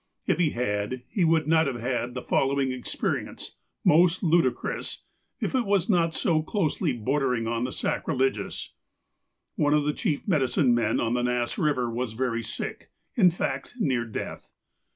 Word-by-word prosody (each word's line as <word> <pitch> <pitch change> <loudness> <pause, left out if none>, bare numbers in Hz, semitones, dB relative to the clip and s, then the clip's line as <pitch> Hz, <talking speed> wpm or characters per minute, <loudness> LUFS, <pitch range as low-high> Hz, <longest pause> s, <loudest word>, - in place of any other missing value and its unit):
If - - +1
he 170 -4 +4
had, 120 0 -2
he 195 - 0
would 160 -1 +3
not 160 -1 +4
have 125 -3 -3
had 125 0 -2
the 125 - -4
following 135 -1 +1
experience, 130 -1 -3 0.3
most 170 +3 +5
ludicrous, 165 -6 0 0.4
if - - -2
it 260 -2 +2
was 200 0 +2
not 165 -3 +2
so 160 -4 +2
closely 160 0 0
bordering 125 0 0
on 115 +1 -1
the 130 - -3
sacrilegious: 135 +1 -1 0.8
One 145 0 +3
of 150 - +3
the 150 - +1
chief 165 -4 -2
medicine 135 -6 +3
men 120 -1 +1
on 115 0 0
the 125 - +1
Nass 125 -1 0
Eiver 125 -6 0
was 120 -1 -2
very 115 -1 -1
sick 115 - -6
— - - -48
in 185 -6 +6
fact, 140 - -3
near 130 - +1
death. 115 -2 -6
135 Hz, 165 wpm, -26 LUFS, 120-160 Hz, 0.8 s, in